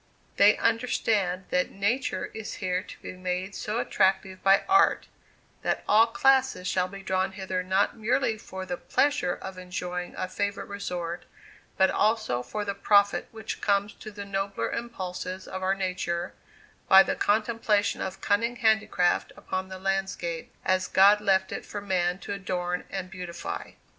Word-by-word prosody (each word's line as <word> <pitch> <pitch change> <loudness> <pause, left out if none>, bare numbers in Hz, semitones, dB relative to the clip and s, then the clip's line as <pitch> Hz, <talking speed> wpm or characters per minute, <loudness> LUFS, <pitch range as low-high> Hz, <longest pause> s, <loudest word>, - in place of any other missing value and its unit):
They 205 +1 +6
understand 215 -5 +1
that 180 0 +1
Nature 215 +7 -1
is 220 -1 -6
here 185 -2 -1
to - - -13
be - - -6
made 185 +1 -3
so 215 0 -3
attractive 190 -4 +1
by 195 0 +5
Art, 390 +1 +4 0.5
that - - -1
all 220 +2 +6
classes 265 -5 +2
shall 185 0 +1
be 195 +1 -10
drawn 190 0 0
hither 190 -1 -3
not 190 +2 +1
merely 235 +1 +1
for 190 -3 -7
the 265 - -4
pleasure 280 -13 +1
of 190 -1 -8
enjoying 180 -1 -5
a - - -3
favorite 200 +2 -2
resort 180 -4 -5 0.5
but 190 0 +4
also 215 - +1
for 205 +12 -4
the 200 - -1
profit 200 0 +3
which 220 -1 -6
comes 200 0 +1
to 215 - -10
the 205 -1 -8
nobler 195 0 -2
impulses 185 -5 -5
of 190 - -5
our 190 +1 +1
nature, 180 -2 -2 0.6
by 190 0 +9
the - - -1
contemplation 215 -1 +1
of 190 0 -5
cunning 230 +4 +1
handicraft 220 -6 +2
upon 185 0 -4
the 190 - -7
landscape, 190 -3 -2
as 185 0 +2
God 200 +2 +6
left 190 -2 +2
it - - -4
for 205 - -6
man 180 -3 0
to - - -3
adorn 180 -2 -3
and 190 -1 -5
beautify. 180 -3 -6
195 Hz, 160 wpm, -27 LUFS, 185-210 Hz, 0.6 s, by